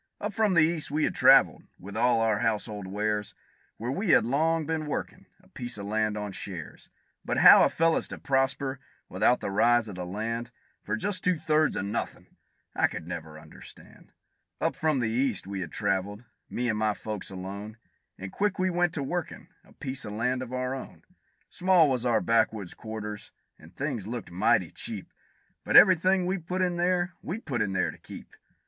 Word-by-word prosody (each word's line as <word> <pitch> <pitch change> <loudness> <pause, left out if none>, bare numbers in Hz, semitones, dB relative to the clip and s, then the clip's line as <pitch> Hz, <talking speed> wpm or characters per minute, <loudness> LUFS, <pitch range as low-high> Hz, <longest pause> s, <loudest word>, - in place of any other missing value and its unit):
Up 210 0 -4
from 210 -2 +2
the 160 - +6
East 160 -1 0
we 150 +2 0
had - - +1
traveled, - - +5 0.2
with 100 +2 -10
all 115 0 +3
of - - +2
our 105 -2 +1
household 105 -3 -2
wares, 105 +1 -2 0.4
Where 120 +3 -3
we 195 +7 -2
had 155 - +5
long 160 +5 +1
been 160 0 -2
workin' 150 - -5 0.2
a - - -22
piece 120 -2 -6
of 100 - -6
land 105 0 0
on 105 -1 -4
shares; 95 -4 -8 0.3
But - - -2
how - - +9
a - - +4
fellow's 165 0 +1
to - - -8
prosper 135 0 0 0.3
without 105 +7 +2
the - - -3
rise 120 +3 +3
of 105 - -7
the 90 -1 -5
land, 115 +5 -3 0.3
For 105 - -2
just 195 - -3
two 180 -2 +2
thirds 155 0 +2
of - - -2
nothin', 105 +3 -5 0.4
I - - +3
never 80 -2 -7
could 75 - -11
understand. - - -15 0.5
Up - - 0
from 155 -5 0
the 115 - 0
East 120 -3 0
we 100 0 -5
had 90 - -5
traveled, 100 +2 -2 0.2
me 125 +1 -2
and 110 -2 0
my 110 -1 +1
folks 105 -3 -6
alone, 100 +3 -7 0.4
And 95 0 -7
quick 205 -1 -1
we 185 0 +1
went 175 -1 +1
to 145 - -2
workin' 170 +3 -4
a - - -22
piece 135 -2 -5
of 105 - -6
land 125 +4 -1
of 130 -1 -7
our 130 0 -2
own; 135 - -9 0.5
Small 180 -3 +4
was 125 -3 0
our 115 -2 +2
backwoods 110 -4 +1
quarters, 105 -2 -7 0.3
and 80 +4 -17
things 130 -8 -3
looked 115 -5 -6
mighty 90 +2 +2
cheap; - - -6 0.5
But - - +5
every 185 -2 +9
thing 185 +2 +1
we 185 +1 -1
put 180 +3 -2
in 175 -1 0
there, 175 0 +1
we 180 - -4
put 140 - -3
in 95 - -1
there 95 - 0
to - - -16
keep. - - -12
120 Hz, 200 wpm, -27 LUFS, 105-160 Hz, 0.5 s, how